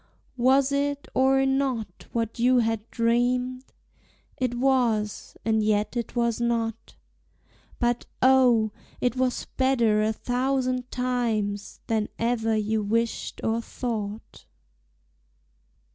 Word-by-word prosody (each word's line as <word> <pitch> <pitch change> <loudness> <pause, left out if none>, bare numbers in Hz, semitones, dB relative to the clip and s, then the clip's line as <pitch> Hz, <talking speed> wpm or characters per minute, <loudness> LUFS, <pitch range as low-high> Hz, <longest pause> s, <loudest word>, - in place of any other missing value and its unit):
Was 260 +2 +4
it 285 0 -1
or 270 +1 +3
not 265 -7 -1
what 230 -1 -2
you 250 +2 +4
had 225 -2 0
dreamed? 250 +2 0 0.7
It 250 -2 -1
was, 240 -5 0
and 220 -1 +2
yet 210 +2 +1
it 235 0 -3
was 235 -1 0
not; 230 -1 -2 0.8
But 240 -1 0
O, 250 -4 +4 0.3
it 250 0 0
was 255 -1 0
better 235 -5 +3
a 215 +1 +2
thousand 255 +1 -1
times 230 -5 -2
Than 220 -2 0
ever 225 -1 0
you 215 0 0
wished 230 +3 -1
or 225 +1 0
thought. 220 -3 -5
235 Hz, 110 wpm, -26 LUFS, 220-255 Hz, 0.8 s, Was